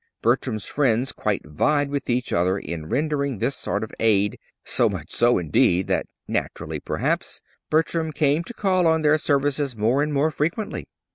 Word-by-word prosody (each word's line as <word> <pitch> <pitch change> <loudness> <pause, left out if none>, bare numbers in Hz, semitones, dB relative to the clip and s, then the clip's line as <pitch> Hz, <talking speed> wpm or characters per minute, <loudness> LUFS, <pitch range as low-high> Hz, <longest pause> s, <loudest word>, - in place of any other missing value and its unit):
Bertram's 115 -3 +1
friends 130 -2 +1
quite 105 -2 -2
vied 145 - +1
with 140 -2 -3
each 125 +1 0
other 90 +3 +2
in 80 -3 -6
rendering 140 -3 0
this 135 - 0
sort 100 +3 -2
of 110 - -6
aid, 105 -2 +2 0.2
so - - +3
much - - -6
so, 120 +1 +3
indeed, 90 +2 +2
that - - -1 0.2
naturally, - - -3
perhaps - - -2 0.3
Bertram 160 +1 +1
came 150 +2 +2
to 240 - -8
call 185 -5 +2
on 160 -1 +2
their 150 +1 +4
services 140 -2 +1
more 115 +6 +2
and 150 +1 0
more 145 +2 +2
frequently. 165 +9 -2
140 Hz, 165 wpm, -23 LUFS, 110-150 Hz, 0.3 s, their